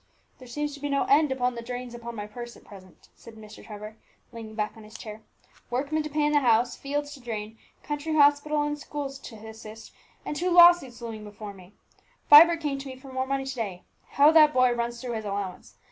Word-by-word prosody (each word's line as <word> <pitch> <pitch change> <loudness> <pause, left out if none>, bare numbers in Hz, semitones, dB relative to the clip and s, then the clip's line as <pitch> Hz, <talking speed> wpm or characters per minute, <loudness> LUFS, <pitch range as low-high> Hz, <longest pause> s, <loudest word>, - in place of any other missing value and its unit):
"There 255 - -13
seems 295 +4 -4
to 285 - -10
be 290 +1 -4
no 280 0 +1
end 295 +2 +3
to 265 - -1
the 250 -2 -1
drains 245 0 -6
upon 235 0 -8
my 205 -1 -5
purse 240 +3 -9
at - - -19
present," 185 -3 -16
said 230 - -14
Mr. 215 -1 -13
Trevor, 215 +1 -10 0.3
leaning 225 -2 -9
back 210 -1 -2
on 220 - -13
his 215 +1 -12
chair; 215 -1 -9 0.5
"workmen 280 +5 -1
to 305 - -5
pay 300 0 0
in 295 - +2
the 295 - +4
house, 240 -2 +2
fields 290 +1 -4
to 285 - -12
drain, 220 -2 -6 0.2
county 300 +1 -3
hospital 295 0 +3
and 295 0 -3
schools 280 -2 -6
to 240 - -11
assist, 220 0 -11 0.3
and - - -4
two 360 +4 -1
law 345 0 +9
suits 265 -9 -9
looming 220 -2 -6
before 210 0 -9
me! 185 0 -16 0.6
Vibert 330 +3 +9
came 285 -3 -2
to 275 - -8
me 260 - -7
for 260 0 -13
more 260 0 -2
money 270 0 -2
to 265 - -4
day. 200 -7 -5 0.3
How 290 +2 +6
that 305 -2 +6
boy 255 -1 +4
runs 235 0 -3
through 245 -1 -5
his 220 -1 -4
allowance! 200 -2 -5
250 Hz, 225 wpm, -26 LUFS, 220-290 Hz, 0.6 s, law